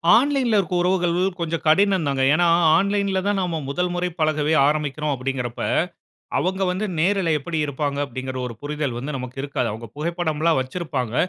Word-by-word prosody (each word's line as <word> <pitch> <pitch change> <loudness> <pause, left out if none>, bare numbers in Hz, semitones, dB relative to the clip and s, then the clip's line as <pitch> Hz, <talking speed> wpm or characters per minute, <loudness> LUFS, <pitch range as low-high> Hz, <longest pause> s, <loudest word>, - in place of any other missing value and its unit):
ஆன்லைன்ல 255 -3 +3
இருக்க 180 -2 -2
உறவுகள் 175 -1 +1 0.2
கொஞ்சம் 165 -1 -2
கடினம் 190 +1 +4
தாங்க. 135 -1 0
ஏன்னா 175 +3 +3 0.3
ஆன்லைன்ல 200 0 +1
தான் 205 -1 +1
நம்ம 170 -3 -1
முதல்முறை 180 +4 -1
பழகவே 155 0 +1
ஆரம்பிக்கிறோம் 150 0 -1
அப்படிங்கற 130 -1 -2
அப்ப, - - -6 0.8
அவங்க 190 +1 -1
வந்து 190 +4 -1
நேருல 180 0 +2
எப்படி 160 +3 -4
இருப்பாங்க 145 0 -2
அப்படிங்கற 130 +1 -6
ஒரு 120 - -6
புரிதல் 145 -4 -3
வந்து 135 +3 -4
நமக்கு 130 0 -6
இருக்காது. 140 -4 -2
அவங்க 115 +2 -8
புகைப்படம்ல்லாம் 160 -1 0
வச்சிருப்பாங்க. 130 -4 -3
155 Hz, 155 wpm, -22 LUFS, 140-180 Hz, 0.8 s, கடினம்